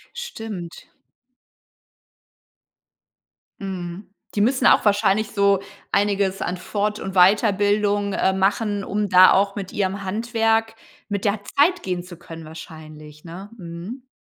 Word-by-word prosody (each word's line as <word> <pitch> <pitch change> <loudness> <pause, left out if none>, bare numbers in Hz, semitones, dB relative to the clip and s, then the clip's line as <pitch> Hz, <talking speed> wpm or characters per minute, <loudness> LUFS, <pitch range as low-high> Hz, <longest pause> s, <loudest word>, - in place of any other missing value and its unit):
Stimmt. 220 - -7 2.7
Mhm. 185 -1 -6 0.3
Die 205 - +2
müssen 255 +3 +2
auch - - +6
wahrscheinlich 205 0 +2
so 200 -2 +3 0.3
einiges 200 -1 +1
an 180 - -2
Fort 210 +3 -2
und 190 - -5
Weiterbildung, 205 +1 +3
äh, 190 - +1
machen, 200 +2 0
um 205 +2 -1
da 185 -1 +7
auch 195 +1 +2
mit 195 -2 -6
ihrem 200 0 -2
Handwerk 225 +2 0 0.3
mit 200 -2 -3
der 205 +1 +1 0.2
Zeit 350 +6 +3
gehen 180 -1 -2
zu 180 -1 -11
können 165 -1 -10
wahrscheinlich, 155 -1 -12
ne? 185 +5 -10
Mhm. 185 +8 -8
200 Hz, 120 wpm, -22 LUFS, 185-210 Hz, 2.7 s, da